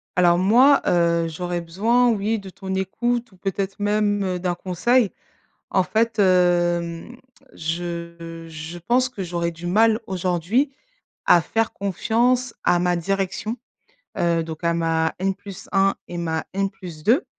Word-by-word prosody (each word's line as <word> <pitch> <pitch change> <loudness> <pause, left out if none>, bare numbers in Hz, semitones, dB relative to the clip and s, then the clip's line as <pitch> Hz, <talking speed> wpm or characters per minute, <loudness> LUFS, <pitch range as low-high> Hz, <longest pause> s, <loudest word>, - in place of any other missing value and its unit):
Alors 175 -1 +4
moi, 245 +10 +5
heu, 170 -1 +2
j'aurais 175 +2 -3
besoin, 225 +9 +2
oui 220 0 0
de 195 -1 -10
ton 190 +1 -6
écoute 235 +5 -1
ou 185 - -20
peut-être 195 +1 -3
même, 205 0 +1
heu, 180 -1 -2
d'un 180 -1 -1
conseil. 195 +6 +1 0.6
En 190 - +2
fait, 220 +5 0
hem, 175 +1 +2 0.4
je 170 0 -5
je 160 +2 -8
pense 245 +8 +1
que 215 - -7
j'aurais 170 -1 -2
du 170 +1 -8
mal 220 +4 +4
aujourd'hui 185 - 0 0.5
à 175 - +6
faire 225 +7 -1
confiance 235 +5 0
à 175 - +3
ma 180 0 +1
direction. 195 +5 -2 0.6
Heu, 170 -1 +2
donc 160 +1 -8
à 170 0 +2
ma 165 -1 0
N+ 195 +1 +1 0.4
1 195 0 +3
et 175 - -6
ma 160 -2 -2
N+ 195 0 0 0.4
2. 255 - +4
185 Hz, 145 wpm, -22 LUFS, 170-215 Hz, 0.6 s, à